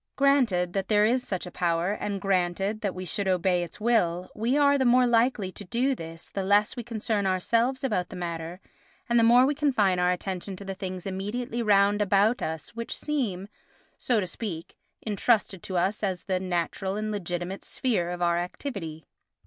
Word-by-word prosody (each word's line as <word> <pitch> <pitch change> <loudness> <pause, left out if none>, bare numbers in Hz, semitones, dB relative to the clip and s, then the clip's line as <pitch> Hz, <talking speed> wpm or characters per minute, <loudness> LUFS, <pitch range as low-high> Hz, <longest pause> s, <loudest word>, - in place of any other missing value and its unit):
Granted 240 -11 +3
that 195 -1 -1
there 210 -1 +4
is 245 +3 +2
such 185 -2 -3
a 180 - -8
power, 170 +1 0
and 205 -1 -3
granted 195 +2 0
that 200 -4 -2
we 185 0 -5
should 195 +3 -3
obey 180 -1 +2
its 175 -2 -7
will, 185 -6 +1
we 235 +6 0
are 285 -1 +5
the 270 - +2
more 250 0 +5
likely 230 -4 +2
to 205 - -10
do 245 +8 0
this 165 -7 -8
the 195 - -4
less 205 +4 +3
we 245 - -4
concern 220 -3 -2
ourselves 235 +8 +1
about 195 -9 0
the - - -8
matter 170 0 -5 0.5
and 235 0 +3
the - - +4
more 240 +3 +6
we 285 - +2
confine 220 -11 +2
our 180 0 +3
attention 185 +1 -3
to 200 - -10
the 195 - -4
things 185 -1 -6
immediately 210 +5 -3
round 205 -1 +4
about 205 +5 +3
us 160 -1 -4
which 230 0 -6
seem, 225 -11 -2 0.5
so 240 -3 +1
to 195 - -1
speak, 175 -2 -6 0.3
entrusted 210 -3 +1
to 185 +1 -3
us 195 +4 0
as 190 -4 -2
the 185 -2 -1
natural 185 +1 -2
and 215 0 -2
legitimate 180 -1 -4
sphere 215 -10 -1
of 175 0 -3
our 170 0 +2
activity. 175 - -5
200 Hz, 190 wpm, -27 LUFS, 180-230 Hz, 0.5 s, more